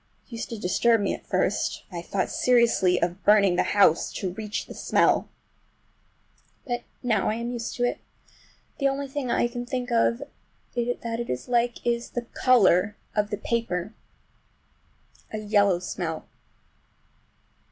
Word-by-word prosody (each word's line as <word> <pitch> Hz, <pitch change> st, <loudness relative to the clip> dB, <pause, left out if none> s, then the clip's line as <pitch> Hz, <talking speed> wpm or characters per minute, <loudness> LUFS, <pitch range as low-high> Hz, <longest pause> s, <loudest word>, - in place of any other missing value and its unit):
It -, -, -30 dB
used 230 Hz, 0 st, -5 dB
to 230 Hz, -, -5 dB
disturb 225 Hz, +4 st, +2 dB
me 200 Hz, -, 0 dB
at -, -, -9 dB
first. -, -, 0 dB
I 170 Hz, -1 st, -5 dB
thought 190 Hz, +2 st, -2 dB
seriously 235 Hz, -7 st, +3 dB
of 175 Hz, +2 st, -2 dB
burning 200 Hz, -3 st, +5 dB
the -, -, +3 dB, 0.2 s
house—to 185 Hz, 0 st, +3 dB
reach 210 Hz, +1 st, -4 dB
the -, -, -10 dB
smell. -, -, +2 dB, 1.4 s
But 245 Hz, -3 st, -2 dB, 0.2 s
now 220 Hz, -5 st, +1 dB
I 215 Hz, -, 0 dB
am 235 Hz, +1 st, -3 dB
used 235 Hz, -2 st, -4 dB
to 245 Hz, -, -1 dB
it. 245 Hz, -, 0 dB, 0.8 s
The 275 Hz, -, +3 dB
only 275 Hz, +1 st, -2 dB
thing 270 Hz, -2 st, -4 dB
I 240 Hz, -, +2 dB
can 240 Hz, 0 st, -5 dB
think 245 Hz, 0 st, -4 dB
of 235 Hz, +2 st, +2 dB, 0.5 s
that 235 Hz, -1 st, -2 dB
it 235 Hz, -, -4 dB
is 125 Hz, -, -3 dB
like 240 Hz, -1 st, 0 dB
is 235 Hz, 0 st, 0 dB
the 240 Hz, -1 st, -4 dB, 0.2 s
color 210 Hz, -5 st, +4 dB, 0.2 s
of 210 Hz, -1 st, +1 dB
the 205 Hz, -, -2 dB
paper! 215 Hz, -3 st, -2 dB, 1.4 s
A 215 Hz, -, -3 dB
yellow 205 Hz, -3 st, +3 dB
smell. 175 Hz, -3 st, -4 dB
230 Hz, 150 wpm, -26 LUFS, 195-240 Hz, 1.4 s, burning